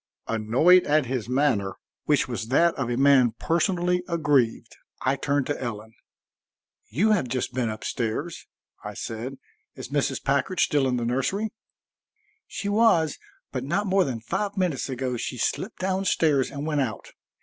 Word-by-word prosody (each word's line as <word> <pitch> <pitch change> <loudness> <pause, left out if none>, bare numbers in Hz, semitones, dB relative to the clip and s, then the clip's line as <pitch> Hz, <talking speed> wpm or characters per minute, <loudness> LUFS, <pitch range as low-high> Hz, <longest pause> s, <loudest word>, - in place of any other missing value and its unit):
Annoyed 120 +12 +4
at 150 -1 +3
his 125 -2 -3
manner, 125 -8 +1 0.3
which 150 -2 +2
was 115 -4 -4
that 165 +7 +3
of 130 -4 -3
a 120 - -1
man 135 -4 +5
personally 180 +1 +1
aggrieved, 145 -9 +1 0.3
I 130 +1 +1
turned 140 0 0
to 145 - -3
Ellen. 110 -2 -5 1.0
"You 195 - +2
have 185 -11 +2
just 125 +1 -2
been 125 -2 0
up 110 0 -6
stairs," 125 +8 -3 0.4
I - - -7
said. 120 +4 -5 0.4
"Is - - -8
Mrs. 140 -2 -1
Packard 140 +7 0
still 145 -3 +3
in 125 -1 0
the 120 - -2
nursery?" 185 - -1 1.0
"She 200 - -5
was, 205 -8 +3 0.3
but 130 -2 -3
not 180 +10 -1
more 195 0 +3
than 120 -7 -4
five 200 - -3
minutes 175 -8 -1
ago 130 -1 -2
she 125 - -4
slipped 190 - -2
down 190 +1 -1
stairs 150 -7 +2
and 140 +1 -5
went 150 -2 0
out. 110 -6 -4
140 Hz, 160 wpm, -25 LUFS, 120-170 Hz, 1.0 s, man